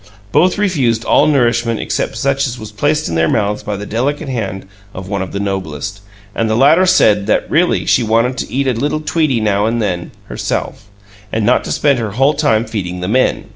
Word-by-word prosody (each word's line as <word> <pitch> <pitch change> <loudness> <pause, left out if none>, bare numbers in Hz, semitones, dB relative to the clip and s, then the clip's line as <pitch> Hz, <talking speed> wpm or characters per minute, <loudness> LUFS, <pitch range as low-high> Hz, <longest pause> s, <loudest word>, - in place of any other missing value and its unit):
Both 180 - +3
refused 135 - 0
all - - +4
nourishment 120 -5 +1
except - - -2
such 140 +3 0
as 125 0 -5
was 110 -2 -9
placed 145 +8 0
in - - -4
their 80 0 +2
mouths 105 -1 0
by 105 -1 -4
the 105 - -6
delicate 140 +7 -2
hand 100 -7 -4 0.3
of 95 0 -7
one 100 -1 -2
of 95 - -5
the 100 - -4
Noblest, 95 -1 -4 0.3
and 115 +1 -1
the 110 - +1
latter 160 +8 +5
said 105 - +3
that - - +1
really 170 +3 +2
she - - +3
wanted 115 +3 +1
to - - -5
eat 135 +2 0
a 130 - +1
little 145 +6 -2
tweetie 155 -5 0
now 105 0 +1
and 115 +1 -1
then 90 -6 -2 0.2
herself, - - -4 0.5
and 110 -1 -1
not 125 - +3
to - - -4
spend 140 -4 +2
her 110 -3 -3
whole 135 +6 +3
time 130 -7 +1
feeding 90 -6 -4
the 90 - -3
Men. 120 0 0
115 Hz, 210 wpm, -16 LUFS, 100-140 Hz, 0.5 s, latter